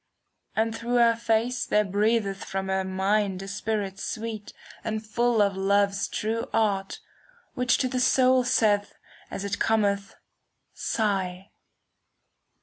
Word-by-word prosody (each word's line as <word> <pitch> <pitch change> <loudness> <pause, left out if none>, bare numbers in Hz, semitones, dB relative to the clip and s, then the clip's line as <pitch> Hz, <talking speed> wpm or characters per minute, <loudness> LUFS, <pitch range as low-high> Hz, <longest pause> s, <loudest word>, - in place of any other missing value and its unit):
And 225 +1 0
through 235 +2 -2
her 235 -1 +5
face 230 +2 0
there 210 0 +2
breatheth 205 0 0
from 190 0 -4
her 190 0 +1
mind 190 +1 0
A - - -8
spirit 200 -1 -3
sweet 220 -2 -5 0.3
and 220 0 -3
full 235 0 +2
of 200 -1 0
Love's 200 +1 +1
true 225 +2 -3
art. 200 -3 0 0.5
Which 250 0 +2
to 260 - 0
the 255 0 -2
soul 255 0 +4
saith, 210 -5 +2 0.3
as 200 - -5
it 200 0 -3
cometh, 200 -3 +1 0.4
" - - -50
Sigh." 195 -3 -2
210 Hz, 135 wpm, -26 LUFS, 195-230 Hz, 0.5 s, her